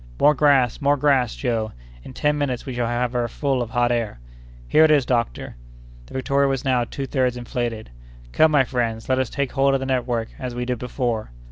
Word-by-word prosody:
"More 150 - +6
grass! 135 -3 +3
more 145 +1 +3
grass, 135 -4 +2
Joe! 115 -4 -2 0.3
In - - -10
ten 150 +2 +1
minutes 140 -4 -2
we 130 - -5
shall 120 -1 -1
have 120 +1 -1
her 120 -1 0
full 135 +1 -1
of 120 - -3
hot 120 +1 +1
air." 115 - -2 0.5
"Here 155 - +5
it 160 - +5
is, 145 -4 +4
doctor!" 115 - -2 0.5
The - - -12
Victoria 140 +1 +1
was 135 -1 -2
now 125 -2 +2
two 135 +3 -5
thirds 130 -2 0
inflated. 120 - -4 0.4
"Come, 160 - +4
my 145 -3 +4
friends, 115 -3 -2
let 130 0 +2
us 130 -3 0
take 140 -2 -2
hold 135 0 +2
of - - +1
the 135 - -4
network, 120 -3 -1
as 125 -2 -5
we 125 0 -3
did 125 -2 -2
before." 120 -3 -2
125 Hz, 215 wpm, -22 LUFS, 120-135 Hz, 0.5 s, More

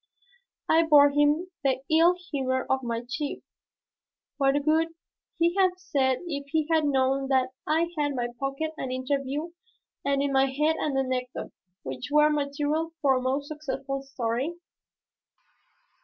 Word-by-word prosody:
I 325 - +5
bore 295 -3 +6
with 295 +5 +3
the 265 -1 +1
ill 340 +3 +5 0.2
humor 260 -3 -1
of 265 0 +1
my 235 -1 -3
chief. 280 +3 -4 0.9
What 275 -1 +3
would 320 +1 +3 0.5
he 340 0 +3
have 370 -1 +4
said 265 -8 0
if 285 -4 -4
he 310 +1 0
had 320 -2 +3
known 270 -1 +1
that 260 -1 +2 0.2
I 330 +2 +1
had 295 -2 +1
in 285 - -4
my 240 -1 -1
pocket 275 +3 -2
an 265 - -4
interview 275 +4 -2 0.5
and 280 0 +1
in 280 -1 -1
my 270 0 +4
head 300 +4 +1
an 280 -3 -1
anecdote 255 -1 -2 0.3
which 130 -1 -6
were 300 +1 +5
material 295 +3 -1
for 270 -2 +3
a - - -2
most 270 +3 -1
successful 275 -3 -4
story? 270 +3 -2
280 Hz, 150 wpm, -27 LUFS, 265-310 Hz, 0.9 s, bore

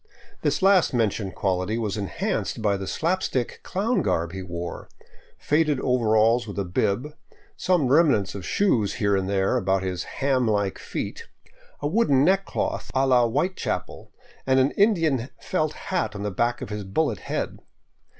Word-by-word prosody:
This - - 0
last 190 -8 +4
mentioned 105 -4 0
quality 95 +2 -1
was 110 -4 -2
enhanced 100 +2 -2
by 105 -2 +1
the 95 -1 -5
slap 180 - 0
stick 125 -3 -2
clown 220 +6 0
garb 85 0 0
he 95 +1 -6
wore, 85 -1 -6 0.2
— - - -29
faded 150 -2 +1
overalls 115 -2 +2
with 100 - -7
a 100 - -1
bib, 105 - -1 0.4
some 180 - +1
remnants 135 - +3
of 100 - -7
shoes 115 - +1
here 100 -4 +1
and 95 0 -1
there 95 -1 +1
about 95 0 +1
his 90 -2 -3
ham 135 -3 0
like 100 -3 0
feet, - - -5 0.5
a 145 - 0
wooden 150 - +3
neck 195 +2 +3
cloth - - -3
a 135 +1 +3
la 125 -2 +4
Whitechapel, 150 +11 -3 0.4
and 130 0 +4
an 130 +2 +3
Indian 165 - +2
felt 155 -4 -1
hat 185 - -3
on 100 - -5
the 105 - -2
back 120 +5 0
of - - -7
his 105 -1 -4
bullet 110 - -1
head. - - -4
120 Hz, 170 wpm, -25 LUFS, 100-150 Hz, 0.5 s, last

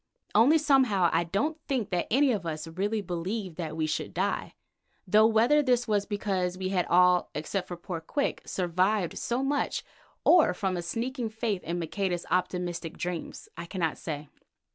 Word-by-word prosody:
Only 255 +9 +6
somehow 260 - +3
I 165 +1 +2
don't 290 - -1
think 235 -7 -1
that 175 -1 0
any 270 +3 +4
of 205 -6 -1
us 155 -1 -4
really 200 +6 -1
believed 185 +1 -4
that 160 -3 -4
we 160 - +1
should 155 0 -3
die, 195 +3 -1 0.5
though 215 +3 +5
whether 235 +7 +4
this 245 -3 +1
was 205 -2 +1
because 190 -4 -1
we 185 0 -2
had 185 -2 0
all, 180 0 +4
except 180 +5 -3 0.2
poor 175 -4 -4
Quick, 280 - -2
survived 185 +1 0
so 245 +3 -1
much, 285 +1 -1 0.4
or 315 - +6
from 190 0 -1
a 175 - -2
sneaking 230 +6 -3
faith 220 -3 -2
in 170 +2 -3
Maqueda's 175 +1 -2
optimistic 180 -2 -1
dreams, 175 -2 -5
I 170 - -7
cannot 170 -4 -1
say. 150 -2 -6
190 Hz, 165 wpm, -28 LUFS, 175-225 Hz, 0.5 s, Only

